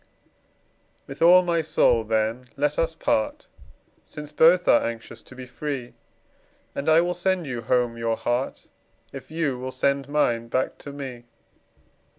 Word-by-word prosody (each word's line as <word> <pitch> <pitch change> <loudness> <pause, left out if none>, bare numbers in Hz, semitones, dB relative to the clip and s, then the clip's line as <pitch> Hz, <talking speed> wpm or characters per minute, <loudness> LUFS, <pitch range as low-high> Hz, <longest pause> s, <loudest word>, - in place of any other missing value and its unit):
With 140 - -10
all 180 +2 +7
my 170 -2 +1
soul, 150 -7 +2
then, 110 +3 -1
let 145 +1 0
us 165 0 0
part, 290 - -1 0.6
Since 150 -1 -9
both 170 +4 +4
are - - +5
anxious 115 0 -6
to 130 - -15
be 130 0 -8
free; 130 -1 -5 0.8
And 140 - -2
I 160 +1 +6
will 175 +1 -1
sand 180 0 0
you 125 -4 -4
home 120 0 0
your 115 -1 -1
heart, 120 +2 -2 0.5
If 130 -1 -9
you 155 -5 -2
will 130 +1 -4
send 140 +1 0
mine 120 -6 +1
back 130 +3 -2
to 145 - -9
me. 130 -4 -8
140 Hz, 155 wpm, -24 LUFS, 120-160 Hz, 0.8 s, all